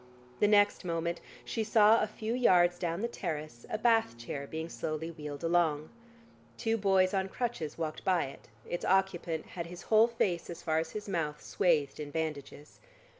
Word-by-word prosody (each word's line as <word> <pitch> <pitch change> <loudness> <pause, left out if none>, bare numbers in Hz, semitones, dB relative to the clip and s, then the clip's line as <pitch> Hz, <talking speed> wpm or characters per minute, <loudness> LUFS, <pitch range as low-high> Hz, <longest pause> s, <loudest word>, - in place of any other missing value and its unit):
The 210 - +4
next 205 -1 +4
moment, 170 -1 -2 0.2
she 225 - -2
saw 220 +1 +5
a 215 - +1
few 220 +2 -4
yards 175 -8 +4
down 170 +1 -2
the 235 - 0
terrace, 155 - -5
a - - -1
bath 225 - +2
chair 140 +4 -6
being 160 +2 -4
slowly 160 0 -4
wheeled 150 -3 -7
along. 165 -3 +1 0.7
Two 225 0 0
boys 190 -3 +3
on 190 -1 0
crutches 230 -10 -3
walked 155 -2 -4
by 180 -4 +2
it, 135 - -11 0.2
its 175 - -4
occupant 180 -4 +1
had 170 -2 -4
his 175 +1 -9
whole 220 +1 +7
face 190 -7 -1
as 170 - -8
far 160 -1 +1
as 160 0 -3
his 210 -1 -5
mouth, 155 -6 -2
swathed 155 -7 +1
in 150 -1 -5
bandages.... 150 -1 -5
175 Hz, 175 wpm, -31 LUFS, 155-205 Hz, 0.7 s, whole